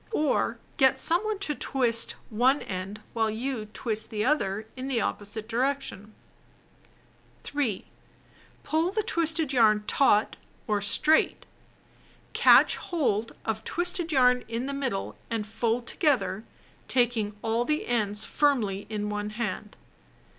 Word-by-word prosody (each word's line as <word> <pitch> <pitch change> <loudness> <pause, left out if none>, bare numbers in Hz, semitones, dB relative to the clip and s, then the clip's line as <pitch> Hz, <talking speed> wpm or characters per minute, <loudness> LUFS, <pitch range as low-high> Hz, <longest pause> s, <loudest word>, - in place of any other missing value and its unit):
Or 305 -7 +1 0.2
get 265 -2 +4
some 345 +4 +3
one 430 0 -1
else 400 0 -3
to 300 - -1
twist 240 -5 +1 0.2
one 255 +6 +2
end 190 +3 -6
while 225 -1 +1
you 225 0 -3
twist 220 0 -3
the 210 0 -2
other 215 -7 0
in 260 +1 -5
the 260 -4 0
opposite 215 0 -3
direction. 240 -4 -2 1.3
3. 250 -10 -2 0.8
Pull 320 +3 +1
the 430 +1 -1
twisted 320 - 0
yarn 215 -4 +4
"taut" 215 -5 +3 0.3
or 210 -2 0
straight. 305 +9 +2 0.9
Catch - - +6
hold 230 - -1
of 220 0 -2
twisted 350 +2 -1
yarn 250 -3 +4
in 230 +2 -3
the 280 - -3
middle 265 -8 -3
and 225 -2 -2
fold 225 +2 -1
together 235 - 0 0.4
taking 230 -4 0
all 225 +1 +1
the 305 +4 -1
ends 215 -3 0
firmly 225 -10 0
in 210 -1 -3
one 210 0 -3
hand. 215 -2 -5
235 Hz, 130 wpm, -27 LUFS, 215-280 Hz, 1.3 s, Catch